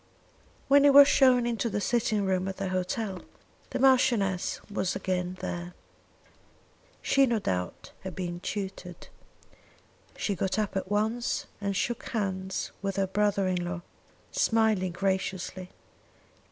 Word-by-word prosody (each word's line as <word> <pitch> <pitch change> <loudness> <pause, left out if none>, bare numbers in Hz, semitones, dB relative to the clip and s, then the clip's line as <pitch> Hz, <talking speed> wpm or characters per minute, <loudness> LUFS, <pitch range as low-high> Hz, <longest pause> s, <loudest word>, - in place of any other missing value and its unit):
When 280 +1 +6
he 285 - +7
was 280 0 +9
shown 255 -4 +5
into 235 -1 -1
the 210 - -1
sitting 220 -2 +1
room 190 0 0
at 190 - -5
the 195 -1 -3
hotel, 185 +1 -2 0.5
the - - -3
Marchioness 240 -8 +2
was 195 -3 -2
again 180 -1 -2
there. 175 0 -5 1.3
She, 275 -1 +4
no 235 -2 +1
doubt, 90 - -3
had 190 -3 -7
been 175 -2 -4
tutored. 190 -2 -6 1.1
She 205 - -1
got 190 +1 -1
up 210 -2 -1
at 190 -1 -2
once 220 +4 0 0.2
and 200 -1 -1
shook 240 +5 -2
hands 190 -4 -2
with 195 -1 -2
her 195 - +1
brother 200 0 +1
in 180 -1 0
law, 175 0 -4 0.5
smiling 220 -5 +2
graciously. 190 0 -2
195 Hz, 135 wpm, -28 LUFS, 185-225 Hz, 1.3 s, was